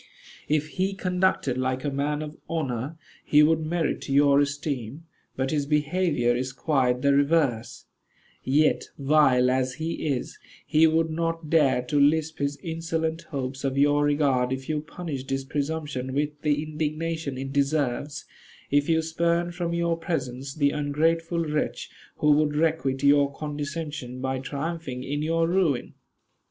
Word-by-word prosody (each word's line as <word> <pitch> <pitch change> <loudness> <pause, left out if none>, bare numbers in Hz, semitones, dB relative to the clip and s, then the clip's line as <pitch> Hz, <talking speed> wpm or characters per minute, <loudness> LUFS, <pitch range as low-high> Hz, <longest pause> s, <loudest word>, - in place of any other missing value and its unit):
If 150 +1 +1
he 195 +1 +1
conducted 180 -9 0
like 130 0 -1
a 145 - -1
man 145 +2 -1
of 150 0 -8
honor, 145 -2 -3 0.3
he 150 0 +5
would 160 +1 +4
merit 160 -2 -2
your 140 0 +5
esteem; 140 -1 -2 0.3
but 130 0 -1
his 145 -2 0
behavior 150 -4 +1
is 130 +1 -3
quite 130 -4 +1
the 140 0 +4
reverse: 140 -5 +1 0.6
yet, 150 +4 +2
vile 135 -3 +4
as 130 0 0
he 160 +1 -3
is, 135 -4 -3 0.3
he 160 +1 +5
would 160 0 +1
not 165 -1 -2
dare 140 -6 +4
to 145 +3 0
lisp 155 +2 +2
his 140 0 -1
insolent 165 -1 -2
hopes 135 -1 -4
of 135 0 -1
your 145 +1 +4
regard 140 -4 +2
if 130 0 -4
you 155 -1 -1
punished 155 -4 -6
his 135 0 -2
presumption 140 -3 -3
with 150 +1 +1
the 150 -1 +1
indignation 155 -1 -3
it 135 +1 -5
deserves; 140 0 0 0.5
if 145 +1 +2
you 160 0 +3
spurned 170 +2 0
from 175 -1 -2
your 170 0 +1
presence 140 -6 -4
the 145 -2 +2
ungrateful 165 +3 0
wretch 150 0 -2 0.2
who 150 - +3
would 150 0 +3
requite 150 -4 0
your 140 0 +5
condescension 145 -3 -5
by 130 0 -2
triumphing 140 -1 -4
in 145 +2 -3
your 165 +1 +1
ruin." 170 -7 +1
150 Hz, 150 wpm, -26 LUFS, 135-160 Hz, 0.6 s, he